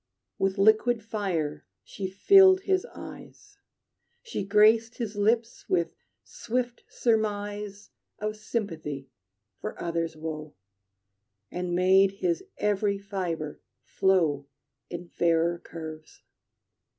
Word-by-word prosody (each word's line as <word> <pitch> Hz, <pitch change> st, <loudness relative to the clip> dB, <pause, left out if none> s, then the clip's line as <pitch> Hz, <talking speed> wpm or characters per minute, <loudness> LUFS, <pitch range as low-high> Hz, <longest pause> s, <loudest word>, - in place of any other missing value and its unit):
With 195 Hz, +1 st, +1 dB
liquid 220 Hz, +3 st, +4 dB
fire 190 Hz, -9 st, -2 dB, 0.2 s
she 190 Hz, -1 st, -5 dB
filled 375 Hz, -, +6 dB
his 380 Hz, -1 st, +1 dB
eyes. 410 Hz, 0 st, -12 dB, 0.6 s
She 460 Hz, -, -4 dB
graced 215 Hz, +3 st, +4 dB
his 220 Hz, -4 st, -4 dB
lips 225 Hz, +3 st, 0 dB
with 170 Hz, -2 st, +1 dB, 0.3 s
swift 245 Hz, 0 st, -3 dB
surmise 205 Hz, -2 st, -1 dB, 0.3 s
Of 215 Hz, 0 st, -3 dB
sympathy 165 Hz, -, -4 dB, 0.5 s
for -, -, -6 dB
others' 165 Hz, -1 st, -2 dB
woe, 155 Hz, -1 st, -6 dB, 1.0 s
And 180 Hz, -1 st, -2 dB
made 190 Hz, +2 st, +5 dB
his 180 Hz, -4 st, -1 dB
every 205 Hz, -1 st, +1 dB
fibre 180 Hz, -6 st, -4 dB, 0.2 s
flow 160 Hz, -7 st, +2 dB, 0.4 s
In 175 Hz, 0 st, -6 dB
fairer 170 Hz, 0 st, +1 dB
curves. 155 Hz, -2 st, -9 dB
195 Hz, 100 wpm, -27 LUFS, 170-220 Hz, 1.0 s, filled